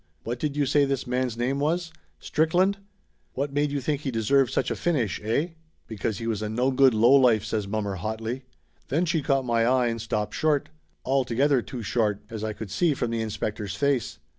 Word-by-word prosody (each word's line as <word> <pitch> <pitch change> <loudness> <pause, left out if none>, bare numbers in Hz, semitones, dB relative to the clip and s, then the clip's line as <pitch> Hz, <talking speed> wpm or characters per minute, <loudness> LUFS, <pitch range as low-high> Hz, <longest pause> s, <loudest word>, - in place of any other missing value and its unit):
What 120 +1 -4
did 150 0 -2
you 145 - +2
say 145 +2 +3
this 135 -1 -1
man's 125 -2 -1
name 130 +3 0
was? 165 +3 -1 0.3
Strick 160 +2 0
land? 195 +2 +3 0.5
What 140 +1 -3
made 145 +1 +1
you 145 - -1
think 145 +2 -1
he 140 - -3
deserved 120 +2 +2
such - - 0
a - - 0
finish 130 - -1
eh?" 115 +11 0 0.4
"Because 110 -1 -3
he 115 - -5
was 110 -2 -1
a 105 - -2
no 125 +5 +1
good 130 -2 +5
lowlife!" 120 -1 +5
says 105 -2 -2
mommer 100 -2 -2
hotly. 110 +5 -4 0.5
Then 160 +6 +1
she 165 -2 0
caught 135 -1 +1
my 115 -1 +2
eye 125 0 +3
and 115 -1 -3
stopped 105 -1 -2
short. 150 -2 +1 0.4
Al 135 +1 +2
together 130 +2 +2
too 120 0 -7
short, 105 -1 0
as 110 -1 -5
I 110 - -1
could 105 -1 -8
see 170 -5 +2
from 120 -3 -2
the 115 -1 -1
inspector's 105 -1 -3
face. 130 - 0
125 Hz, 210 wpm, -26 LUFS, 110-140 Hz, 0.5 s, good